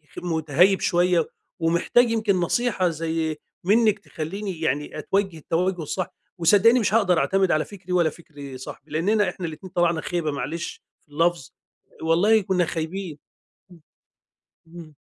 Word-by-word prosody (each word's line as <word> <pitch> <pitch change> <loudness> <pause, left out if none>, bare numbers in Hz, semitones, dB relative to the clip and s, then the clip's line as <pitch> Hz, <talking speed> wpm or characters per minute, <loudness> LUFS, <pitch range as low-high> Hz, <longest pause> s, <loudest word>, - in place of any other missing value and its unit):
خ - - -5
مُتَهيّب 170 +3 +2
شوية 175 -1 +2 0.3
ومحتاج 170 +9 +3
يمكن 215 -3 +1
نصيحة 185 +1 +1
زي 160 -1 -2 0.3
منِّك 215 +2 +3
تخلّيني 185 0 -6
يعني 150 -1 -2
أتوجه 195 +1 -1
التوجه 175 +3 -1
الصح، 180 +4 -4 0.2
وصدّقيني 205 +8 +5
مش 210 -3 0
هاقدر 200 -6 +3
أعتمد 190 0 +2
على 155 0 +2
فكري 190 -3 -11
ولا 170 -3 +3
فكر 145 -4 -11
صاحبي؛ 130 - -8
لإننا 205 +7 +2
إحنا 185 - -6
الاتنين 165 +4 -9
طلعنا 170 -2 +2
خيبة 170 -4 -2
معلش 145 +5 -5 0.2
في 150 - -32
اللفظ 165 -2 0 0.5
والله 185 +7 +4
كُنّا 185 -2 +1
خايبين، 165 0 -4 1.5
امم، 170 +1 -10
اهم. 155 -2 -15
175 Hz, 140 wpm, -24 LUFS, 160-195 Hz, 1.5 s, وصدّقيني